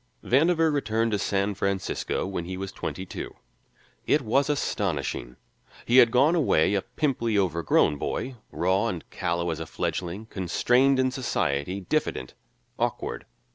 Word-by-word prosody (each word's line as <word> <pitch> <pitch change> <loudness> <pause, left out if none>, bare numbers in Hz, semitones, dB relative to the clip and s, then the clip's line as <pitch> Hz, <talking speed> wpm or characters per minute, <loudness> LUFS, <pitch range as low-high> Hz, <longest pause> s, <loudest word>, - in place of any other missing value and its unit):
Vandover 160 +4 +3
returned 115 -5 0
to 105 - 0
San 100 +1 0
Francisco 100 -1 -2
when 95 -3 -4
he 95 +1 -5
was 95 0 -5
twenty 95 - -5
two. - - -7 0.7
It 145 - +3
was 135 +6 +2
astonishing; 65 - -2 0.5
he 120 - +3
had 120 -2 +8
gone 135 +7 +4
away 110 - +3
a 100 - +2
pimply, 120 -7 -1
overgrown 85 -5 +2
boy, 125 - -3
raw 95 +5 +1
and 90 -7 -4
callow 85 0 -1
as 80 - -4
a 80 - -5
fledgling, 90 +8 -3
constrained 125 +8 +2
in 130 0 +2
society, 95 - -1
diffident, 65 -7 -2 0.5
awkward. - - -2
100 Hz, 140 wpm, -26 LUFS, 90-130 Hz, 0.7 s, had